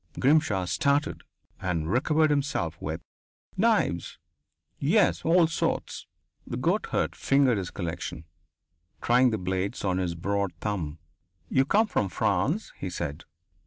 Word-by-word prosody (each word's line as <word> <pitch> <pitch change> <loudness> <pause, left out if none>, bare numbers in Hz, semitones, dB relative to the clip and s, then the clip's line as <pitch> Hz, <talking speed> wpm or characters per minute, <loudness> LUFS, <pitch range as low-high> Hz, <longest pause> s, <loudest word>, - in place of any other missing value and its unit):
Grimshaw 135 -10 +3
started 140 - +1 0.4
and 85 -2 -1
recovered 150 +6 +3
himself 135 - 0
with: 80 +2 -4 0.5
"Knives. 210 - +1 0.6
Yes. - - +3
All 170 +1 +5
sorts." 160 - -2 0.4
The - - -4
goatherd - - 0
fingered 135 -5 +3
his 90 - -4
collection, 85 -3 -5 0.7
trying 125 +2 +4
the 110 - -1
blades 95 +2 -2
on 95 -1 +1
his 90 -2 -1
broad 100 +1 -1
thumb. 85 -8 -3 0.5
"You 135 0 +3
come 210 +10 +3
from 105 - -1
France," 105 - 0
he 95 - -3
said. 80 -3 -5
100 Hz, 125 wpm, -27 LUFS, 90-140 Hz, 0.7 s, All